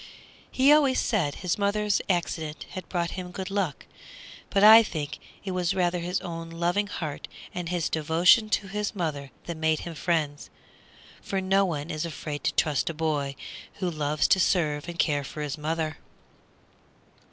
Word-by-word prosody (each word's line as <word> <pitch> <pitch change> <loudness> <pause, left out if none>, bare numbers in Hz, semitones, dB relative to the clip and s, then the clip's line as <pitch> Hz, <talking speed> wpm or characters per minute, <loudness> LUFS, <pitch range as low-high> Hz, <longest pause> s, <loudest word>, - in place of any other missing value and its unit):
He 265 +2 +4
always 280 -4 +4
said 170 -11 0
his 180 +1 -2
mother's 205 0 +1
accident 165 -4 -2
had 185 - -7
brought 170 -2 -1
him 185 -2 -6
good 190 +2 -6
luck, 190 -8 -2 0.6
but 200 0 +2
I 220 +2 +11
think 155 -9 -4 0.3
it 190 - -2
was 180 0 0
rather 180 -1 +1
his 180 +2 -1
own 165 -1 -6
loving 175 +5 0
heart 155 -7 -5 0.3
and 175 -2 -4
his 175 -3 0
devotion 165 +8 +4
to 205 -1 0
his 210 +2 -3
mother 150 -6 -3 0.2
that 170 -2 -5
made 160 -1 +1
him 170 - -6
friends. 155 -3 -1 0.7
For 195 - -2
no 195 +1 +3
one 155 -3 -3
is 155 0 -3
afraid 150 -2 -5
to - - +1
trust 150 -2 +1
a 165 - -5
boy 150 -3 -1 0.4
who 180 -2 -2
loves 150 -1 0
to 190 - +5
serve 160 -4 +1
and 170 - -7
care 145 -4 +1
for 150 +2 -6
his 145 -2 -3
mother. 155 0 -3
170 Hz, 170 wpm, -27 LUFS, 155-190 Hz, 0.7 s, I